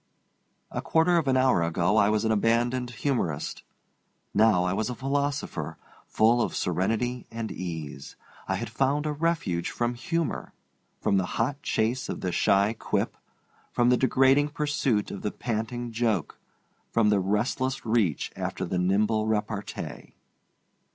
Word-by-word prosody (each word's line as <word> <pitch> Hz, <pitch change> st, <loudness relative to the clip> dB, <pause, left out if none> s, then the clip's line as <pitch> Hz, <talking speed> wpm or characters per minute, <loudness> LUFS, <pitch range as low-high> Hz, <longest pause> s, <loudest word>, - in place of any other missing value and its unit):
A -, -, -3 dB
quarter 165 Hz, +2 st, +3 dB
of 155 Hz, -, -3 dB
an 130 Hz, -1 st, +3 dB
hour 130 Hz, -8 st, +4 dB
ago 85 Hz, +4 st, +1 dB
I 100 Hz, -1 st, +5 dB
was 110 Hz, +1 st, +1 dB
an 110 Hz, -, +2 dB
abandoned 120 Hz, +3 st, +1 dB
humorist. 115 Hz, -, -2 dB, 0.7 s
Now 105 Hz, -4 st, +4 dB
I 90 Hz, 0 st, 0 dB
was 110 Hz, +4 st, -1 dB
a 125 Hz, -, -3 dB
philosopher, 135 Hz, -, -2 dB, 0.3 s
full 115 Hz, +2 st, +3 dB
of -, -, -1 dB
serenity 115 Hz, +8 st, -1 dB
and 115 Hz, -2 st, -5 dB
ease. 80 Hz, -6 st, -6 dB, 0.3 s
I -, -, 0 dB
had -, -, -3 dB
found 140 Hz, +3 st, +1 dB
a 150 Hz, -, 0 dB
refuge 150 Hz, -, -1 dB
from 120 Hz, 0 st, -1 dB
humor, 165 Hz, +7 st, -2 dB, 0.5 s
from 100 Hz, -2 st, +2 dB
the 95 Hz, -1 st, 0 dB
hot 135 Hz, +5 st, 0 dB
chase 115 Hz, +3 st, 0 dB
of -, -, -4 dB
the 90 Hz, -, -1 dB
shy 100 Hz, +4 st, +3 dB
quip, -, -, -1 dB, 0.6 s
from 120 Hz, 0 st, +3 dB
the 125 Hz, -, +5 dB
degrading 135 Hz, +3 st, +4 dB
pursuit 145 Hz, -8 st, 0 dB
of 100 Hz, -, -6 dB
the -, -, -1 dB
panting 120 Hz, +2 st, -3 dB
joke, 115 Hz, -6 st, -1 dB, 0.5 s
from 115 Hz, -2 st, +3 dB
the 105 Hz, -1 st, +3 dB
restless 120 Hz, +8 st, -1 dB
reach 110 Hz, -, +1 dB
after -, -, -3 dB
the 90 Hz, -, -1 dB
nimble 105 Hz, +4 st, +2 dB
repartee. 105 Hz, -1 st, -3 dB
115 Hz, 150 wpm, -27 LUFS, 100-130 Hz, 0.7 s, I